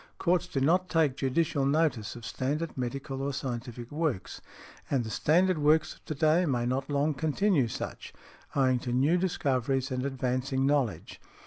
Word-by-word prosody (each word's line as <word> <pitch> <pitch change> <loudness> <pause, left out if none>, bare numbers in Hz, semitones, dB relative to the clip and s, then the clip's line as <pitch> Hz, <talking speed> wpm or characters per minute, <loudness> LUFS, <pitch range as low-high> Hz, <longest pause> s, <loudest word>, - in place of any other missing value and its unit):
Courts 180 -1 +1
do 135 - -2
not 180 +7 +2
take 160 -6 +2
judicial 145 +2 0
notice 140 -7 +1
of 120 -1 -9
standard 150 +8 -2
medical 135 +1 -4
or 140 +1 -1
scientific 120 -2 -5
works, 150 - -2 0.5
and 135 -4 +1
the 110 - -6
standard 180 +5 +2
works 155 +1 +3
of - - -23
to 155 - -4
day 155 +4 +3
may 120 -4 0
not 130 +3 -1
long 145 +2 +1
continue 155 - +1
such, - - -6 0.4
owing 130 -2 +3
to 120 - -4
new 135 +7 +3
discoveries 135 -7 0
and 130 0 -1
advancing 130 0 -1
knowledge." 130 - -1
135 Hz, 160 wpm, -29 LUFS, 130-155 Hz, 0.5 s, works